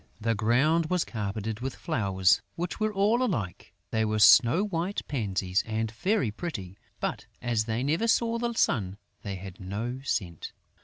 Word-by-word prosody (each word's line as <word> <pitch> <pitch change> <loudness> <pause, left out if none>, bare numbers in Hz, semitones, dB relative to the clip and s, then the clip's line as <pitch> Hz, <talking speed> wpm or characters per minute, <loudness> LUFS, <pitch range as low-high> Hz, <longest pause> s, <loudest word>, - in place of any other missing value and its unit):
The 115 +1 +1
ground 135 +10 +2
was 180 0 +1
carpeted 105 0 -4
with 130 +2 -4
flowers 95 -4 +2
which 175 +4 -4
were 215 0 +1
all 210 +4 +2
alike: 115 - -2 0.2
they 110 0 +1
were 110 0 0
snow 115 - +7
white 190 -1 -2
pansies 95 -7 0
and 110 0 -1
very 140 - 0
pretty; 105 - -6 0.2
but, - - -3
as 115 -3 0
they 115 +2 -1
never 160 +11 +1
saw 230 0 +2
the 235 0 -1
sun, 100 - +1 0.2
they 100 -2 -4
had 95 -1 -9
no 110 +7 -4
scent. 90 - -3
115 Hz, 160 wpm, -28 LUFS, 100-170 Hz, 0.2 s, snow